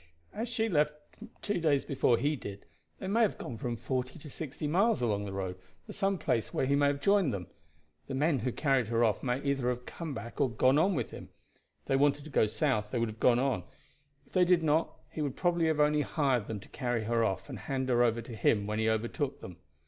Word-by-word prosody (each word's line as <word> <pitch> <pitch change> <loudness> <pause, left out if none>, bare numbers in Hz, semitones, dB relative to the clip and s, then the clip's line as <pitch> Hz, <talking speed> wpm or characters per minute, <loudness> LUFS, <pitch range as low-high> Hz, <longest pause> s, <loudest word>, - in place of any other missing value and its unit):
As 225 +2 -3
she 225 -1 0
left 150 -6 +2 0.5
two 205 -3 0
days 150 -4 +2
before 125 -3 +2
he 150 +4 +1
did, 100 -7 -8 0.3
they - - -7
may 220 +5 +2
have 220 - +2
gone 125 - -6
from 120 +2 -3
forty 130 +4 -3
to 150 -2 -10
sixty 150 0 -5
miles 200 +9 +3
along 105 -4 0
the 100 - -5
road, 95 -1 -4 0.3
to - - -9
some 195 0 0
place 115 -9 -1
where - - 0
he 140 +2 +2
may 145 0 +4
have 140 0 -1
joined 195 -4 +3
them. 95 -5 -4 0.6
The 135 - -4
men 145 0 +2
who 125 +3 -1
carried 135 -4 +1
her 115 +1 +2
off 110 -4 +2
may 125 0 0
either 140 -3 0
have 125 0 -3
come 160 -5 -6
back 115 +4 -6
or 135 - +3
gone 130 +5 +3
on 185 +3 +3
with 125 -6 -2
him. - - -9 0.5
If - - -40
they 135 - +2
wanted 145 +1 +2
to 155 - -10
go 110 - +3
south 105 0 0
they 125 - -2
would 115 -1 -2
go - - +5
on; 130 +2 0 0.6
if - - -27
they 185 - +5
did 175 -1 +4
not, 160 +1 +2 0.2
he 155 - -4
would 145 -3 -2
probably 175 -2 +2
have 160 -1 +1
only 150 0 +4
hired 135 -8 0
them 110 -2 -4
to - - -15
carry 120 -3 -2
her 115 +1 +1
off 95 -4 -1
and 130 -7 -7
hand 130 +4 -2
her 120 -1 +3
over 115 -1 +2
to 120 - -8
him 105 -1 +2
when 105 +1 -2
he 110 0 +2
overtook 120 +5 -1
them. 90 -2 -10
135 Hz, 240 wpm, -31 LUFS, 115-150 Hz, 0.6 s, go